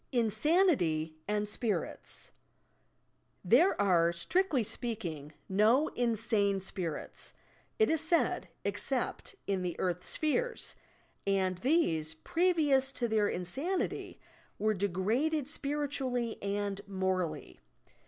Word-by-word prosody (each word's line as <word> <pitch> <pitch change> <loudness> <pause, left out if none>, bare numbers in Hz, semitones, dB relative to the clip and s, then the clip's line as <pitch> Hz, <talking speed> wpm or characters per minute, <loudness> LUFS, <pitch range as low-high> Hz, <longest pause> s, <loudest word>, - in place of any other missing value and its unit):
INSANITY 225 - +2
AND 210 0 0
SPffilTS 210 +1 -3 1.1
There 275 - +4
are, 170 -4 +4
strictly 285 - +1
speaking, 175 - -4 0.2
no 220 +10 +3
insane 220 -4 +1
spirits, 180 -4 -4 0.4
it 440 - +4
is 320 -1 +1
said, 330 +1 +1 0.2
except - - -2
in 195 -2 -1
the 180 -2 -4
earth 180 -1 -1
sphere, 395 - 0 0.7
and 190 -2 +1
these, 165 - +2
previous 295 - +2
to 240 - -1
their 215 -2 +2
insanity, 275 - -3 0.4
were 215 +1 +1
degraded 220 - 0
spiritually 275 -5 -2
and 200 0 -2
morally. 185 -5 -2
215 Hz, 95 wpm, -31 LUFS, 185-285 Hz, 1.1 s, There